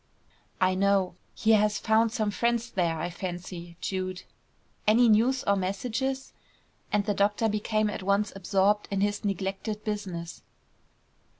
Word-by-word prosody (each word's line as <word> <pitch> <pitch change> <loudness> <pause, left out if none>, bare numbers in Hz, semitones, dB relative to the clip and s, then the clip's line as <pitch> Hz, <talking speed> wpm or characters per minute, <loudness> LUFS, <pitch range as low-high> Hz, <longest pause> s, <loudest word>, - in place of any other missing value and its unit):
"I 185 0 +3
know. 195 -1 +2 0.2
He 220 - +2
has 210 -1 +4
found 220 +1 +2
some 215 -2 0
friends 235 +2 0
there, 170 -3 0
I 175 +2 -3
fancy, 175 -1 -6
Jude. 185 -1 -3 0.6
Any 235 +3 +6
news 235 +4 +3
or 200 - +3
messages?" 245 +8 -2 0.6
and 205 -1 +1
the 210 - +1
doctor 205 +3 +2
became 215 0 0
at 210 - -4
once 200 +2 +1
absorbed 195 +2 +1
in 195 -1 -1
his 205 0 0
neglected 200 +2 -3
business. 185 -5 -4
205 Hz, 135 wpm, -28 LUFS, 185-215 Hz, 0.6 s, Any